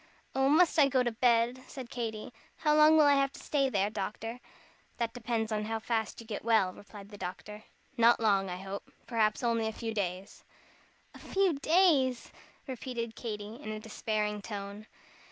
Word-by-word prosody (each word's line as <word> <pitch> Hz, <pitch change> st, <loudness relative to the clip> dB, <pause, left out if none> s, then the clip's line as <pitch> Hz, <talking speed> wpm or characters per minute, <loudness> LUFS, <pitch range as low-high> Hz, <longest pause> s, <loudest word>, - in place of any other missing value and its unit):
"Oh, 270 Hz, +1 st, +2 dB
must 325 Hz, +2 st, +4 dB
I 285 Hz, -, +7 dB
go 260 Hz, -2 st, +2 dB
to 240 Hz, -, 0 dB
bed?" 235 Hz, +2 st, +2 dB
said 260 Hz, -3 st, -9 dB
Katy. 225 Hz, -1 st, -4 dB, 0.2 s
"How 300 Hz, -, +2 dB
long 305 Hz, +1 st, +7 dB
will 305 Hz, -, +6 dB
I 285 Hz, -, +6 dB
have 275 Hz, -1 st, +2 dB
to -, -, -11 dB
stay 275 Hz, -2 st, 0 dB
there, 205 Hz, -3 st, 0 dB
doctor?" 225 Hz, +3 st, -5 dB, 0.6 s
"That 230 Hz, -1 st, -2 dB
depends 230 Hz, -2 st, -2 dB
on 210 Hz, 0 st, -1 dB
how 225 Hz, +1 st, -2 dB
fast 220 Hz, -1 st, -2 dB
you 230 Hz, -, -10 dB
get 215 Hz, -2 st, -5 dB
well," 220 Hz, -5 st, +3 dB
replied 205 Hz, 0 st, -12 dB
the 205 Hz, -1 st, -12 dB
doctor; 210 Hz, +4 st, -7 dB, 0.3 s
"not 235 Hz, +1 st, +5 dB
long, 200 Hz, -4 st, +2 dB
I 180 Hz, -, -4 dB
hope. 195 Hz, +1 st, -7 dB
Perhaps 220 Hz, -1 st, +1 dB
only 230 Hz, -2 st, +1 dB
a -, -, -1 dB
few 225 Hz, 0 st, -5 dB
days. 190 Hz, -2 st, -4 dB, 0.7 s
"A -, -, -13 dB
few 385 Hz, -3 st, +1 dB
days!" 285 Hz, -5 st, +2 dB, 0.3 s
repeated 240 Hz, -3 st, -5 dB
Katy, 215 Hz, -1 st, -6 dB
in 245 Hz, -, -8 dB
a 215 Hz, -, -4 dB
despairing 215 Hz, -1 st, -2 dB
tone. 200 Hz, 0 st, -7 dB
225 Hz, 180 wpm, -31 LUFS, 210-255 Hz, 0.7 s, I